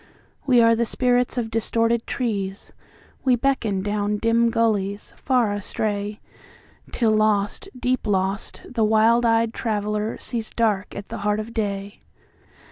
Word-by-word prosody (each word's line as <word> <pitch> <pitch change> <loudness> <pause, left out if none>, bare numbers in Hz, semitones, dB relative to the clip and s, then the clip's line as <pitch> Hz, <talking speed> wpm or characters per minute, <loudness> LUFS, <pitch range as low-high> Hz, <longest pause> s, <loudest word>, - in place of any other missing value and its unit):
We 250 -3 +5
are 230 0 +5
the 235 - +1
spirits 245 +1 +1
of 225 -2 -2
distorted 230 +1 0
trees; 200 -6 -3 0.5
We 255 -2 +4
beckon 230 -7 0
down 205 0 -1
dim 230 +2 +2
gullies, 210 -3 0
far 245 -6 +1
astray, 205 0 -3 0.7
Till 230 -3 +1
lost, 215 -1 +1
deep 250 -2 -1
lost, 195 0 -1
the 235 -3 -1
wild 225 +2 +4
eyed 225 0 +2
traveller 210 -1 -2
seesDark 220 -3 -2
at 200 - -7
the - - -5
heart 210 +1 0
of 220 +2 -6
day. 200 -2 -3
220 Hz, 130 wpm, -23 LUFS, 205-230 Hz, 0.7 s, We